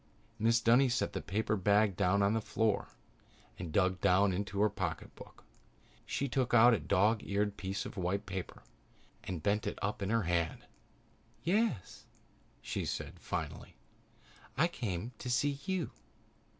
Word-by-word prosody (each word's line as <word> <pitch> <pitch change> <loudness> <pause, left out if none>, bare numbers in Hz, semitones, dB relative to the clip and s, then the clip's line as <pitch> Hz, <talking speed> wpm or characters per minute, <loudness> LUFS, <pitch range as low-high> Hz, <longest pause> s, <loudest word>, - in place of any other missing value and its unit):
Mrs. 115 +1 +3
Dunny 125 +3 +5
set 120 - 0
the - - -3
paper 105 +4 -1
bag 100 0 +3
down 100 +1 +2
on 100 +2 +3
the 110 - +1
floor 110 0 0 0.7
and 85 -3 -5
dug 95 +1 +2
down 95 +1 +4
into 100 +2 -3
her 105 - +6
pocketbook. - - -6 0.6
She 140 - -1
took 130 -1 +1
out 120 +1 +8
a 110 - +2
dog 105 +8 +2
eared 100 0 -1
piece 95 0 -4
of - - -8
white 95 +3 -1
paper 95 -2 -6 0.6
and 90 -4 -5
bent 105 +1 +1
it - - -3
up 100 +1 -2
in 100 - -1
her 115 0 +2
hand. 85 -1 -1 0.8
"Yes," 195 - 0 0.6
she - - -3
said - - -5
finally. - - -5 0.8
"I 160 +6 +4
came 110 - -4
to 125 - -5
see 140 +3 +1
you. 190 -4 -1
105 Hz, 150 wpm, -33 LUFS, 95-115 Hz, 0.8 s, out